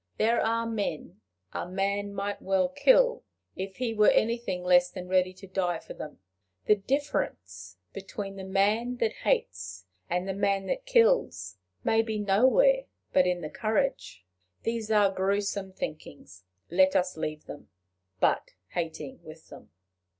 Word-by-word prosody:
There 230 +2 +2
are 230 +1 0
men 205 - -4 0.3
a - - -4
man 200 +2 -1
might 200 +1 -3
well 190 -1 +1
kill, - - +4 0.3
if 190 0 -5
he 245 -3 -1
were 210 -1 +5
anything 230 -5 0
less 180 0 +5
than 180 -1 -8
ready 185 0 +2
to 185 +1 -13
die 180 -2 -1
for - - -10
them. 150 - -8 0.5
The - - +6
difference 95 - -3 0.2
between 195 0 -6
the 195 - -7
man 210 +6 +1
that 225 -2 +1
hates 95 +1 -2 0.2
and 180 +2 -1
the 195 - -1
man 200 0 0
that - - -3
kills 460 - +2 0.3
may 225 0 +3
be 220 -1 -3
nowhere 260 - +4 0.3
but 185 -1 +4
in 180 -1 0
the 155 - -5
courage. 220 - -2 0.4
These 230 -1 -2
are 205 -3 +4
grewsome 195 0 -1
thinkings: 145 - -8 0.3
let 190 +2 +4
us 180 -1 +1
leave 155 -1 -4
them 145 - -10 0.5
but - - +1
hating 175 +10 -5
with 155 0 -13
them. - - -13
195 Hz, 150 wpm, -28 LUFS, 180-225 Hz, 0.5 s, The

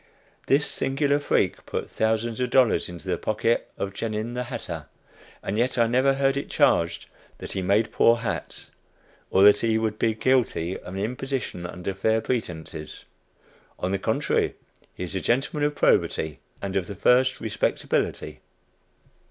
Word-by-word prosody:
This 145 +2 +3
singular 140 +2 0
freak 145 - 0
put - - -3
thousands 110 +1 -1
of 125 -1 0
dollars 125 -7 +3
into 85 -3 -9
the - - -1
pocket 110 +2 0
of 100 0 -3
"Genin, 110 +2 -3
the 125 0 -3
hatter," 80 -9 -5 0.6
and 105 +3 -2
yet 125 +2 +1
I 115 - +5
never 130 +4 +3
heard 135 0 +2
it 140 - -4
charged 85 0 +2 0.3
that - - -7
he 95 - -2
made 100 +4 +2
poor 115 - +5
hats, 115 -2 -5 0.6
or 95 - +4
that 105 0 +7
he 115 -1 +2
would 110 -1 -1
be 110 -1 +2
guilty 110 -8 +1
of 90 - -8
an - - -3
"imposition 125 -4 -3
under 90 +2 -5
fair 110 +4 +1
pretences." 85 -10 -4 0.7
On 90 - -2
the 100 - 0
contrary, - - 0 0.4
he - - -5
is 90 - -5
a 95 - -2
gentleman 135 +4 +1
of 150 - -5
probity, 80 - +1 0.2
and 100 -1 -3
of 95 -2 0
the 100 - -6
first 130 +6 +3
respectability. 110 -2 -1
110 Hz, 160 wpm, -25 LUFS, 95-125 Hz, 0.7 s, that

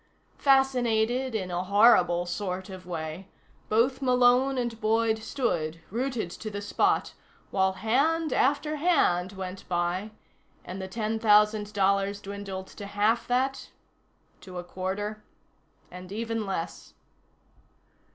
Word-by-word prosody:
Fascinated 255 -2 +2
in 185 -4 -2
a 175 +1 -1
horrible 200 -3 +5
sort 185 +1 -4
of 185 -1 -10
way, 165 +1 -5 0.4
both 245 +5 +2
Malone 250 +1 +4
and 235 -2 -3
Boyd 220 0 +2
stood, 175 - -2
rooted 240 -5 -2
to 215 - -6
the 205 -1 -5
spot, 205 - +1 0.4
while 190 0 +2
hand 280 - +1
after 300 +3 +1
hand 205 - +2
went 190 0 -7
by 175 +3 -1 0.6
and 185 +2 -6
the 190 - -5
ten 220 +2 -2
thousand 210 -1 +4
dollars 200 0 +1
dwindled 195 -1 -6
to 200 +1 -10
half 210 +3 +1
that, 265 +2 0 0.7
to 185 -2 -10
a 175 - -4
quarter, 200 +4 -4 0.7
and 180 +1 -10
even 225 0 -3
less.... 185 -4 -5
210 Hz, 120 wpm, -27 LUFS, 190-240 Hz, 0.7 s, horrible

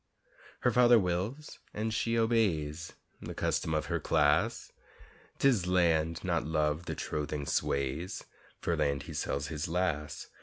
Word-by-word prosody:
Her 120 - +3
father 120 0 +6
wills 100 +10 -2 0.2
and 110 +1 -1
she 115 +1 0
obeys, 85 -9 +1 0.3
The - - -7
custom 80 - 0
of 75 - 0
her - - -1
class; 75 -1 +1 0.7
'Tis 120 -10 +3
Land 85 -3 +2
not 85 -3 0
Love 75 +1 0
the - - -4
trothing 75 -1 -3
sways 70 +8 -1 0.4
For - - 0
Land 70 -1 0
he - - -8
sells 70 +1 -2
his 75 -1 -3
lass. 80 -4 -2
85 Hz, 140 wpm, -31 LUFS, 75-105 Hz, 0.7 s, father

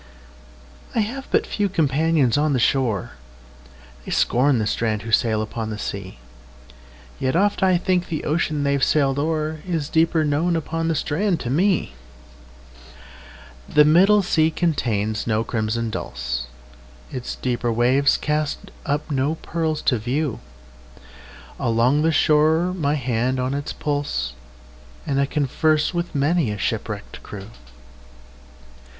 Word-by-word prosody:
I 225 - +3
have 260 +6 -4
but - - +2
few 205 -1 -1
companions 155 - +2
on 150 0 +2
the 130 - +1
shore:They - - -4
scorn 130 +2 +3
the 110 - 0
strand 110 0 -1
who 115 - -6
sail 110 -1 +2
upon 110 0 -5
the 105 - -4
sea; 100 -5 -6 1.0
Yet 130 +3 0
oft 205 +4 +2
I 185 -2 +4
think 180 0 0
the 155 - -3
ocean 155 -1 0
they've 140 -1 +1
sailed 140 -2 +2
o'erIs 155 +1 -2
deeper 160 0 +2
known 155 +4 +1
upon 165 0 -2
the 165 - +1
strand 175 +5 0
to 120 - -3
me. 180 - +1 1.8
The 150 0 +5
middle 195 +7 +5
sea 160 -3 +2
contains 115 - -1
no 110 -1 +1
crimson 115 0 -2
dulse, - - -4 0.6
Its 125 -1 -5
deeper 120 -1 -1
waves 125 +5 +3
cast 150 0 -2 0.2
up 145 +2 -1
no 140 +3 0
pearls 160 -2 -2
to 125 - +2
view; 130 +4 -2 1.2
Along 120 +5 +2
the 165 +1 +3
shore 160 +3 +3
my 150 -5 0
hand 130 -1 0
is 125 - -1
on 130 +2 -1
its 140 0 -3
pulse, 145 - -2 0.7
And 140 0 +1
I 140 - +1
converse 150 +3 +1
with 170 -2 -3
many 145 -1 +2
a 105 - -3
shipwrecked - - -4
crew. 100 +1 -9
145 Hz, 135 wpm, -22 LUFS, 115-160 Hz, 1.8 s, The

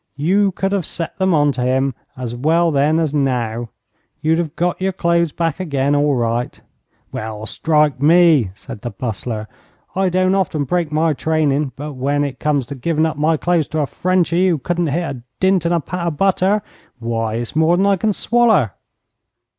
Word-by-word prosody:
You 195 +7 +2
could 195 +2 -1
have 195 -5 -1
set 165 -1 -5
them 190 0 +2
on 145 -1 +3
to 125 - -4
him 130 +2 +1 0.2
as 125 -2 -4
well 165 +6 +2
then 150 +2 +2
as 160 -3 0
now. 120 -5 -1 0.5
You'd 160 +2 +1
have 165 -2 -3
got 175 +2 -1
your 190 0 0
clothes 170 -2 +1
back 165 +1 -2
again 140 -5 0
all 145 -1 +2
right.' 120 0 -1 0.5
'Well, 110 0 -5
strike 150 +1 +1
me!' 160 - +5
said 105 0 -10
the 120 - -4
Bustler. 110 0 -5 0.5
'I 190 0 +2
don't 185 +1 +2
often 175 -6 0
break 170 +2 -1
my 155 +1 +2
trainin', 150 -2 0
but 150 +2 -6
when 140 +2 0
it 135 -2 -4
comes 145 -4 0
to 130 - -7
givin' 155 +4 0
up 160 -2 -2
my 155 +2 +2
clothes 170 -2 +1
to 155 - -3
a - - +1
Frenchy 185 +3 +1
who 170 - +1
couldn't 175 +4 -1
hit 145 -2 -2
a - - -13 0.2
dint 190 -2 +2
in - - 0
a 170 - +2
pat 170 +2 -4
o' - - +3
butter, 195 +4 +1 0.3
why, 115 -2 -2
it's 120 +3 -4
more 160 +2 +3
than 195 - +2
I 200 0 +4
can 215 +3 0
swaller.' 220 - +2
155 Hz, 195 wpm, -19 LUFS, 135-175 Hz, 0.5 s, me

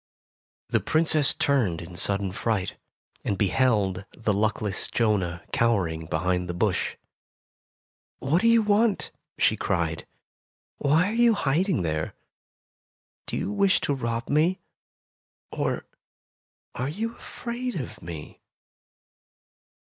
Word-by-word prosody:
The - - +3
Princess 155 -3 +2
turned 115 - +1
in 85 +1 -9
sudden 100 +1 0
fright, 100 -1 -1 0.5
and 100 - -1
beheld 100 -3 +2
the 110 -3 +1
luckless 105 -1 0
Jonah 95 -7 0
cowering 90 -9 +1
behind 90 +2 0
the 90 - -3
bush. 95 0 0 1.2
''What 155 +7 +2
do 230 - +3
you 230 -1 +5
want 210 0 +2
'' - - -57
she - - +4
cried. 80 -1 -1 0.7
"Why 155 +6 +3
are 210 - -2
you 235 -1 +5
hiding 165 - +1
there? 80 -1 -2 1.1
Do - - -2
you 190 - -2
wish 200 -2 +3
to 145 - 0
rob 115 -2 -2
me, 160 +6 +2 0.9
or - - -2 0.9
are 125 +3 -2
you 225 +9 -3
afraid 245 +1 -5
of 135 -9 -5
me 80 -3 -8
115 Hz, 120 wpm, -26 LUFS, -, 1.2 s, you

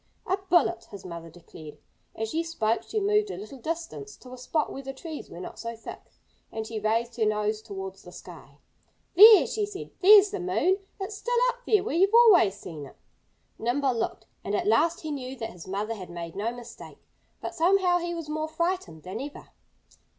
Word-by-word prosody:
"A 375 - +1
bullet!" 330 -10 +3
his 200 -4 -11
mother 170 -2 -8
declared. 160 -2 -13 0.4
As 220 0 -3
she 325 - 0
spoke 235 -10 -1
she 435 - -3
moved 420 +1 +2
a - - -5
little 290 -10 -9
distance, 335 - -5
to 255 0 -13
a - - -8
spot 300 +5 -1
where 270 - -6
the 270 0 -7
trees 315 +2 -8
were 170 - -10
not 180 - -8
so 230 0 -5
thick. 230 - -9 0.5
And 220 0 -4
she 220 0 -5
raised 230 +3 -1
her 225 - +2
nose 215 0 0
towards 190 -2 -7
the 180 - -13
sky. 160 -6 -13 0.6
"There!" 425 +3 +10
she 430 - -2
said. 400 -2 -8
"There's 410 +1 +8
the 405 - -3
moon! 370 +1 +1 0.2
It's 395 +2 -5
still 485 0 -1
up 485 - -3
there 425 -4 +4
where 445 - -3
you've 390 +5 +4
always 405 - +7
seen 155 -8 -9
it." - - -17 0.6
Nimble 260 +3 +1
looked; 225 -1 -3 0.2
and 200 - -2
at - - -1
last 310 +11 +2
he 315 - -5
knew 265 -2 -5
that 225 -3 -5
his 175 -5 -12
mother 205 +4 -2
had 190 -5 -9
made 170 -1 -7
no 210 +4 -1
mistake. 240 -1 -11 0.4
But - - -5
somehow 360 +1 +3
he 345 0 -3
was 330 -2 -6
more 310 +1 -2
frightened 335 - -3
than 185 +6 -6
ever. 285 +1 -9
265 Hz, 200 wpm, -27 LUFS, -, 0.6 s, There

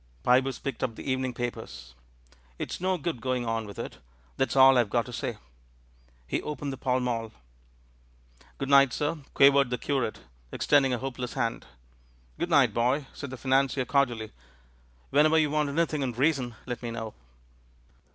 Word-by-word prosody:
Pybus 130 +2 +3
picked 140 - -5
up 120 -3 -1
the - - -9
evening 130 0 -1
papers. 110 - -6 0.6
"It's - - -5
no 185 0 +1
good 155 -6 -4
going 125 -1 -1
on 115 -1 -2
with 100 - -10
it; - - -6 0.4
that's 135 - 0
all 135 0 +8
I've 115 -4 +1
got 120 +1 +1
to 125 - -9
say." 115 -1 -3 0.9
He 60 - -2
opened 145 -2 -4
the - - -7
Pall 130 0 0
Mall. 115 -3 -2 1.3
"Good 135 - -4
night, 140 -3 +6
sir," 150 +2 -1 0.2
quavered 140 -1 +6
the 125 - -1
curate, 130 - -2 0.3
ex - - -4
tending 140 -2 +4
a 125 - +1
hopeless 125 -1 -5
hand. 115 -4 -2 0.7
"Good - - -1
night, - - +4
boy," 125 +5 +1
said 140 - -7
the 130 - -7
financier 135 0 +1
cordially. 120 -6 0 0.8
"Whenever 155 +3 +5
you 155 -2 +2
want 150 -1 +1
anything 155 0 0
in 130 -3 -1
reason 130 -2 0
let 125 -2 -5
me 120 - -4
know." 115 -2 -5
130 Hz, 170 wpm, -28 LUFS, 120-140 Hz, 1.3 s, all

